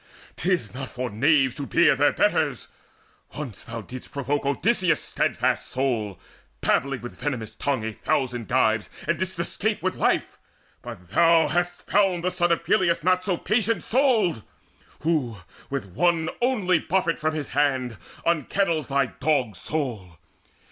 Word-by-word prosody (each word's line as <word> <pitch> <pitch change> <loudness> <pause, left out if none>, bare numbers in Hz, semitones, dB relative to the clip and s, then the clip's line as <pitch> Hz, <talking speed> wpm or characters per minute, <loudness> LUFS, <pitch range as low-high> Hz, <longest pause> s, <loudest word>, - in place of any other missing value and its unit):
'Tis 175 - 0
not 130 0 -6
for 125 -1 -4
knaves 135 +3 +3
to 140 +1 -6
beard - - +4
their - - +5
betters: - - +1 0.7
once 140 -8 -6
Thou 115 0 -6
didst 125 +4 -9
provoke 140 +1 -2
Odysseus' 180 +1 +2
steadfast - - -1
soul, 115 -7 -1 0.4
Babbling 135 -2 +1
with 120 - -8
venomous 125 -7 -3
tongue 135 -6 -1
a 110 - -3
thousand 125 -5 -1
gibes, - - +2 0.2
And - - +1
didst - - -3
escape - - -2
with - - 0
life; - - 0 0.4
but 105 -8 -10
thou 165 -1 +5
hast 175 0 -1
found 190 -4 +2
The 180 - +1
son 175 -1 +1
of 170 - +1
Peleus 170 -3 +2
not 185 +1 +3
so 185 -2 0
patient 220 +3 0
souled, 225 - +2 0.6
Who 145 -9 0 0.3
with 135 -5 -3
one 160 - +1
only 210 -9 +2
buffet 175 -1 0
from 155 0 0
his 150 -3 -4
hand 130 -5 0 0.3
Unkennels 170 0 +1
thy 140 0 +2
dog's 125 - -1
soul! 115 - -4
145 Hz, 150 wpm, -25 LUFS, 125-175 Hz, 0.7 s, their